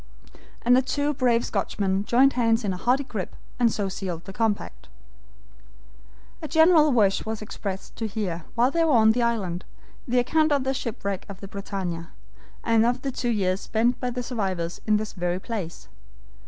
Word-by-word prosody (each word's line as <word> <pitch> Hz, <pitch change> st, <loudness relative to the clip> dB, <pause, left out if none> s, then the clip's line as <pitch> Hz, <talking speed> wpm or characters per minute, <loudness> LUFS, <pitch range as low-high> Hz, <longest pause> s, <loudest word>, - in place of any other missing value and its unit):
And 245 Hz, +1 st, +5 dB
the 260 Hz, -, +5 dB
two 285 Hz, +2 st, -1 dB
brave 245 Hz, -3 st, +2 dB
Scotchmen 195 Hz, -1 st, -1 dB
joined 265 Hz, +5 st, +4 dB
hands 230 Hz, -1 st, +2 dB
in 200 Hz, -2 st, 0 dB
a -, -, -5 dB
hearty 250 Hz, +8 st, +2 dB
grip 215 Hz, -9 st, -5 dB, 0.2 s
and 235 Hz, -2 st, +4 dB
so 205 Hz, -2 st, -1 dB
sealed 180 Hz, -3 st, -5 dB
the 195 Hz, -, -8 dB
compact. 220 Hz, -1 st, -2 dB, 1.5 s
A 310 Hz, -, -4 dB
general 320 Hz, -1 st, +5 dB
wish 205 Hz, -6 st, +3 dB
was 220 Hz, 0 st, -4 dB
expressed 200 Hz, -2 st, -6 dB
to 225 Hz, -, -2 dB
hear, 190 Hz, -6 st, -3 dB
while 245 Hz, +3 st, +3 dB
they 335 Hz, +1 st, +2 dB
were 320 Hz, -3 st, +3 dB
on 220 Hz, -2 st, +6 dB
the 240 Hz, +2 st, 0 dB
island, 200 Hz, -7 st, -1 dB, 0.4 s
the 250 Hz, +1 st, +1 dB
account 310 Hz, +5 st, +3 dB
of 280 Hz, -2 st, +2 dB
the 265 Hz, 0 st, 0 dB
shipwreck 205 Hz, -7 st, -4 dB
of 195 Hz, -1 st, -8 dB
the 195 Hz, -, -8 dB
BRITANNIA, 190 Hz, -4 st, -5 dB, 0.5 s
and 225 Hz, -1 st, +4 dB
of 245 Hz, +2 st, 0 dB
the 275 Hz, -, -1 dB
two 245 Hz, -1 st, -2 dB
years 195 Hz, -3 st, 0 dB
spent 235 Hz, +2 st, +1 dB
by 250 Hz, -, -1 dB
the 245 Hz, 0 st, -3 dB
survivors 190 Hz, -8 st, -3 dB
in 215 Hz, 0 st, +4 dB
this 215 Hz, 0 st, -4 dB
very 180 Hz, -1 st, -1 dB
place. 175 Hz, -, -6 dB
220 Hz, 180 wpm, -25 LUFS, 195-250 Hz, 1.5 s, on